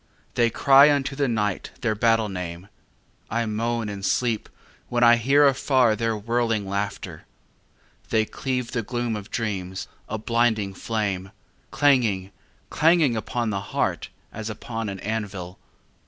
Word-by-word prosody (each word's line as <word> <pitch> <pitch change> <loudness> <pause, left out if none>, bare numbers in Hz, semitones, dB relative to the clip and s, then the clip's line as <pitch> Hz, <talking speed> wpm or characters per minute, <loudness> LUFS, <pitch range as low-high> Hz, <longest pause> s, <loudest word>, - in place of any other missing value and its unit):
They 120 -1 +3
cry 140 +4 +6
unto 140 -1 0
the 140 0 +1
night 105 -5 -1
their 115 -2 +1
battle 115 0 +2
name: 90 -1 -6 0.6
I 115 +1 0
moan 115 +1 -1
in 100 -1 -6
sleep 110 +3 0 0.4
when 120 0 +1
I 120 0 +8
hear 140 +5 +4
afar 130 -4 +3
their 115 0 -1
whirling 115 -1 0
laughter. 100 +1 -4 0.8
They 110 -1 +2
cleave 125 +1 -3
the 120 - -1
gloom 120 0 -2
of 105 0 -7
dreams, 95 -5 -3 0.2
a - - -2
blinding 110 -3 +1
flame, 100 -3 -2 0.4
Clanging, 115 -10 +2 0.4
clanging 160 -6 +4
upon 115 +1 -2
the 100 -1 -2
heart - - -2 0.2
as 110 +1 -5
upon 115 0 -5
an 95 -1 -6
anvil. 100 -4 -4
115 Hz, 140 wpm, -24 LUFS, 100-120 Hz, 0.8 s, I